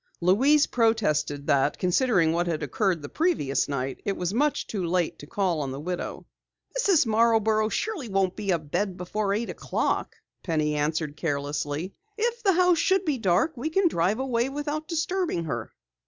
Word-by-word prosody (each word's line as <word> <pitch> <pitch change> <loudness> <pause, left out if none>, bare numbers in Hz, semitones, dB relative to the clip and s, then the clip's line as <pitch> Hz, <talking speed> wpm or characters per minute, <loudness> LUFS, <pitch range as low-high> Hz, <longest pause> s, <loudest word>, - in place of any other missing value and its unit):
Louise 265 - +4
protested 155 -12 +1
that, 140 +1 +2
considering 180 -3 +2
what 175 +1 0
had 160 -2 -2
occurred 170 - 0
the - - -5
previous 310 - 0
night, 135 -1 -3
it 200 - -2
was 180 +1 -2
much 290 +5 +1
too 200 -4 -4
late 175 0 0
to 145 - -10
call 180 -3 0
on 140 - -3
the 135 - -5
widow. 175 +4 -5 0.5
"Mrs. 395 - +3
Marborough 220 -1 +3
surely 345 - -3
won't 195 -2 +1
be 210 -2 -5
abed 175 +3 -1
before 195 +3 -2
eight 220 +4 -1
o'clock," - - -2 0.3
Penny 155 -3 0
answered 150 0 -1
carelessly. 145 +3 -3 0.2
"If 475 +2 -1
the 395 -3 +3
house 360 -1 +4
should 380 +2 +2
be 290 -5 0
dark, 200 - +2
we 260 +6 -3
can 380 +3 +3
drive 190 - +1
away 255 -1 0
without 295 +2 -4
disturbing 335 - -1
her." 120 -8 -4
195 Hz, 170 wpm, -26 LUFS, -, 0.5 s, Louise